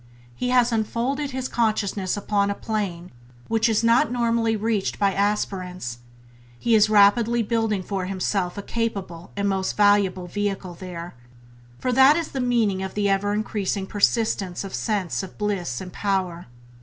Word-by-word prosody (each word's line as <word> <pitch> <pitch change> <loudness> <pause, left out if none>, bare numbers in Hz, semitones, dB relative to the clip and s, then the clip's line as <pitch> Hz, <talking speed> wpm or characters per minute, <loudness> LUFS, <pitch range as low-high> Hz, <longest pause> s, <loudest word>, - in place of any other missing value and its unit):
He 250 - -2
has 250 -1 +4
unfolded 240 +6 -1
his 260 -1 -3
consciousness 210 -4 0
upon 200 0 0
a 200 - -1
plane 190 -6 -3 0.4
which 225 +1 +2
is 220 0 +1
not 230 0 +4
normally 230 -2 +1
reached 215 -2 -1
by 200 -1 +2
aspirants; 185 - -2 0.6
he 235 - 0
is 215 -1 +5
rapidly 220 +3 +4
building 220 -3 0
for 190 -1 -3
himself 185 0 -1
a 200 - -4
capable 195 -8 -4
and 200 0 0
most 190 -1 -1
valuable 205 -3 +3
vehicle 195 -1 -3
there 175 -1 -8 0.3
— 120 0 -25
for 255 - -1
that 265 +4 +6
is 335 -2 -2
the 265 - -3
meaning 230 -6 +1
of 190 0 -5
the 205 -1 +1
ever 195 +1 +1
increasing 205 -2 -2
persistence 200 -3 0
of 195 - -7
sense 205 -6 -1
of 190 - -10
bliss 190 - -2
and 180 -1 -8
power. 185 -5 -2
205 Hz, 160 wpm, -24 LUFS, 190-225 Hz, 0.6 s, that